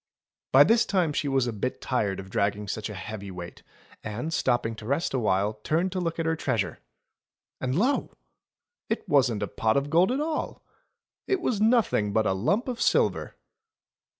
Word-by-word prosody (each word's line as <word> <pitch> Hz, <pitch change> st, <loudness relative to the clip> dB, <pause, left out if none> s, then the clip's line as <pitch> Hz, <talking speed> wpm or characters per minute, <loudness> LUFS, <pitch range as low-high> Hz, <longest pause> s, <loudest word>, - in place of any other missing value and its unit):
By -, -, +8 dB
this 230 Hz, +1 st, +4 dB
time 180 Hz, -6 st, +1 dB
she 145 Hz, -, -1 dB
was 135 Hz, -2 st, +2 dB
a 120 Hz, -, -2 dB
bit 115 Hz, +5 st, -3 dB
tired 105 Hz, -7 st, -1 dB
of 95 Hz, 0 st, -9 dB
dragging 100 Hz, -1 st, 0 dB
such 110 Hz, +2 st, -4 dB
a 105 Hz, -, -7 dB
heavy 100 Hz, +1 st, -7 dB
weight, 90 Hz, -2 st, -8 dB, 0.4 s
and, 120 Hz, +10 st, -4 dB
stopping 120 Hz, -5 st, +1 dB
to 105 Hz, -, -9 dB
rest 140 Hz, +5 st, 0 dB
a 130 Hz, -, +1 dB
while, 105 Hz, -1 st, +1 dB
turned 170 Hz, +4 st, +1 dB
to 185 Hz, -, -2 dB
look 165 Hz, -2 st, -2 dB
at 165 Hz, -, -1 dB
her 160 Hz, 0 st, +1 dB
treasure. 120 Hz, -, -2 dB, 0.8 s
And 130 Hz, 0 st, -1 dB
lo! 255 Hz, +9 st, +1 dB, 0.8 s
it 225 Hz, -, -2 dB
wasn't 125 Hz, -7 st, +2 dB
a -, -, -1 dB
pot 110 Hz, +5 st, 0 dB
of 140 Hz, +1 st, -1 dB
gold 175 Hz, +7 st, +4 dB
at 265 Hz, -, 0 dB
all! 310 Hz, +1 st, -3 dB, 0.6 s
It 390 Hz, -, +1 dB
was 235 Hz, -, -1 dB
nothing 220 Hz, -, +2 dB
but 110 Hz, 0 st, +2 dB
a 95 Hz, -, +2 dB
lump 195 Hz, -, 0 dB
of 245 Hz, -2 st, -4 dB
silver. -, -, +1 dB
130 Hz, 185 wpm, -27 LUFS, -, 0.8 s, By